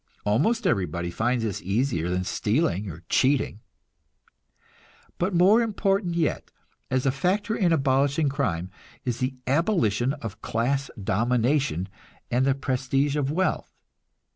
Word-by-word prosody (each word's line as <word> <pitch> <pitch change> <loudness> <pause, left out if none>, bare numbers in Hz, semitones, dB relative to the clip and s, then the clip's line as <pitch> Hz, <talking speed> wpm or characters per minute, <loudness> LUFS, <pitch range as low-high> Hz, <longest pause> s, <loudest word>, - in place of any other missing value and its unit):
Almost 215 - +1
everybody 90 - 0
finds 120 +5 0
this 105 -4 -3
easier 100 - 0
than 90 +1 0
stealing 105 - 0
or 85 0 -9
cheating. 130 -5 +2 1.6
But 180 +1 0
more 195 +7 +6
important 195 -5 0
yet, 165 -3 -1 0.4
as 130 0 0
a 135 - +3
factor 195 - 0
in 180 -5 +2
abolishing 140 0 +2
crime, 95 - -1 0.3
is 120 -2 -2
the 130 +1 -1
abolition 135 - +1
of 115 -8 -8
class 135 +5 -1
domination 115 - +1 0.4
and 130 +3 +2
the 135 - +3
prestige 135 +1 0
of 145 -2 0
wealth. 185 +4 -1
135 Hz, 125 wpm, -25 LUFS, 110-160 Hz, 1.6 s, more